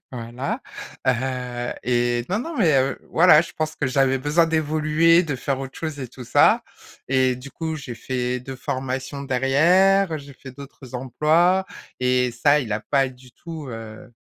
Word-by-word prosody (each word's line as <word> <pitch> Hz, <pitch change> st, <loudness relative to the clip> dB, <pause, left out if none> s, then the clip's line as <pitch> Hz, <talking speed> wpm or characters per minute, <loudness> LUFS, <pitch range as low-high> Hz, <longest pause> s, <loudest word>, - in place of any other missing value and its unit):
Voilà, 120 Hz, +2 st, -4 dB, 0.5 s
heu, 125 Hz, -1 st, -1 dB
et 120 Hz, -1 st, +1 dB
non 200 Hz, +4 st, 0 dB
non, 325 Hz, +5 st, -6 dB
mais, 165 Hz, -7 st, +4 dB
heu, 135 Hz, +1 st, -1 dB
voilà, 165 Hz, -2 st, +6 dB
je 170 Hz, -, -10 dB
pense 155 Hz, 0 st, -3 dB
que 145 Hz, -, -1 dB
j'avais 135 Hz, 0 st, +2 dB
besoin 150 Hz, +5 st, +2 dB
d'évoluer, 155 Hz, +2 st, +3 dB
de 145 Hz, -6 st, -3 dB
faire 135 Hz, +2 st, -2 dB
autre 135 Hz, 0 st, -8 dB
chose 155 Hz, -3 st, -5 dB
et 130 Hz, -, -5 dB
tout 125 Hz, 0 st, -11 dB
ça. -, -, +4 dB, 0.4 s
Et 130 Hz, -1 st, +2 dB
du 130 Hz, +2 st, -10 dB
coup, 160 Hz, -1 st, -4 dB
j'ai 125 Hz, -5 st, -7 dB
fait 125 Hz, +1 st, -3 dB
2 130 Hz, +1 st, -8 dB
formations 135 Hz, +1 st, -4 dB
derrière, 160 Hz, +7 st, +3 dB
j'ai 140 Hz, 0 st, -12 dB
fait 130 Hz, -, -11 dB
d'autres 135 Hz, -1 st, -12 dB
emplois 160 Hz, +9 st, +2 dB, 0.4 s
et 125 Hz, -1 st, +2 dB
ça 145 Hz, +5 st, +3 dB
il 115 Hz, -5 st, -4 dB
a 105 Hz, -, -1 dB
pas 135 Hz, -2 st, +3 dB
du 125 Hz, 0 st, -16 dB
tout, 160 Hz, -4 st, -9 dB
heu, 115 Hz, 0 st, -9 dB
135 Hz, 170 wpm, -23 LUFS, 125-155 Hz, 0.5 s, voilà